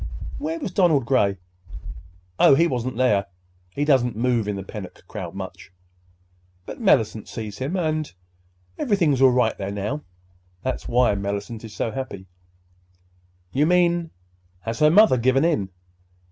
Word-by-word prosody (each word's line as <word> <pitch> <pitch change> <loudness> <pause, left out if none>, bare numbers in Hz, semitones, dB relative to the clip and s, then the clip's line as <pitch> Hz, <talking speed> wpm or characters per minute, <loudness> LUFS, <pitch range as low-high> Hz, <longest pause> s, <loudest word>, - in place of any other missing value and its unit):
"Where 315 +3 -3
was 275 - -4
Donald 170 - +3
Gray?" 105 -7 +2 1.0
"Oh, - - +7
he 165 - +4
wasn't 125 -5 -2
there. 105 -7 +2 0.4
He 145 +11 -2
doesn't 130 -5 +2
move 120 -2 0
in 105 - -1
the 95 - -5
Pennock 95 -1 -9
crowd - - -7
much. - - -8 0.9
But - - -8
Mellicent 110 - +2
sees 105 -2 -7
him, 140 +8 -2
and—and 155 - -1 0.7
everything's 170 - +2
all 135 - +8
right 125 -3 +2
there, 100 -1 -3
now. 105 +9 -3 0.6
That's 130 - -3
why 125 -2 +3
Mellicent 100 +3 -4
is 110 -2 -10
so 115 - -2
happy." 120 -8 -6 1.3
"You 145 +3 +2
mean—Has 115 - -2
her 150 - +6
mother 200 -4 +6
given 130 +5 +3
in?" 105 - 0
125 Hz, 140 wpm, -23 LUFS, 105-155 Hz, 1.3 s, all